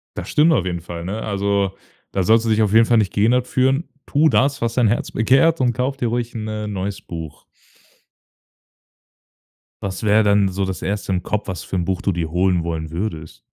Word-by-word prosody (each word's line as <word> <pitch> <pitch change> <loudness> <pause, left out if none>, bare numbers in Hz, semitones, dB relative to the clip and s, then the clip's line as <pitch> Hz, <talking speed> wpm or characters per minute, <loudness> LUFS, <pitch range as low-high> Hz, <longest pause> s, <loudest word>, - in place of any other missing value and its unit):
Das - - -6
stimmt 160 +2 +4
auf 95 - +1
jeden 85 -2 -3
Fall, 85 0 -7
ne? 105 +4 -4
Also, 100 -1 0 0.4
da 95 - 0
sollst 115 +3 +4
du - - 0
dich 110 0 +3
auf 105 -1 +1
jeden 115 0 +6
Fall 120 -1 +3
nicht 100 -3 -1
gehindert 120 +4 +2
fühlen. 135 +5 +1 0.2
Tu 155 +2 +3
das, 140 +1 +1
was 115 0 -1
dein 120 -3 +3
Herz 115 - -1
begehrt, 135 +8 +3
und 120 -2 +2
kauf 130 +3 -2
dir 120 - -1
ruhig 120 0 -3
'n, 110 -1 -4
äh, 110 0 -4
'n 105 - -5
neues 95 +1 -4
Buch. 80 -3 -9 2.4
Was 95 +1 -4
wäre 105 +1 +4
denn 100 -1 +3
so 95 +1 -2
das 95 -1 -3
Erste 100 0 -3
im 90 -1 -1
Kopf, 105 -1 -3
was 90 -4 -5
für - - -5
'n 90 - 0
Buch 95 0 -2
du 100 - 0
dir 85 -2 -3
holen 90 -1 +1
wollen 80 -2 -4
würdest? 80 - -5
100 Hz, 215 wpm, -20 LUFS, 95-115 Hz, 2.4 s, jeden